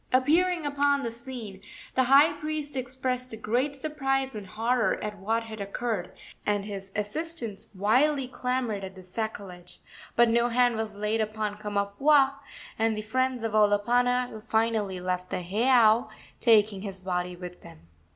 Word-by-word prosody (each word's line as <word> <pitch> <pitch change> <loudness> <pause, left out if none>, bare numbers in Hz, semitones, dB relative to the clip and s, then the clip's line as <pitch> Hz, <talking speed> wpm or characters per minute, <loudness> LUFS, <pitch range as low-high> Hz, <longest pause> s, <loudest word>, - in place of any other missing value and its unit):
Appearing 325 +6 +3
upon 285 -1 +2
the 230 - -2
scene, 230 -5 -8 0.3
the 260 - +3
high 280 +5 +6
priest 305 -2 -4
expressed 255 -1 -3
great 250 +7 0
surprise 270 -2 -1
and 210 -3 -7
horror 230 +4 +1
at 210 -1 -5
what 225 +4 0
had 220 -2 -8
occurred, 200 -2 -3 0.3
and 205 -1 0
his 195 -2 -7
assistants 225 +1 -3
wildly 260 +8 +2
clamored 250 -5 -2
at 190 0 -7
the 185 - -12
sacrilege; 180 -3 -6 0.4
but 235 0 +6
no 235 +1 +3
hand 245 0 +3
was 220 -2 -4
laid 210 +2 0
upon 215 -1 -2
Kamapuaa, 210 +8 +2 0.5
and 225 -1 +2
the 215 - -3
friends 255 +2 0
of 225 - -1
Olopana 235 +3 +2
finally 220 -4 +1
left 180 0 -3
the 180 - -3
heiau, 225 +3 +4 0.3
taking 215 -4 +4
his 195 -2 -7
body 180 -1 -2
with 180 0 -9
them. 165 -1 -14
225 Hz, 150 wpm, -27 LUFS, 205-255 Hz, 0.5 s, high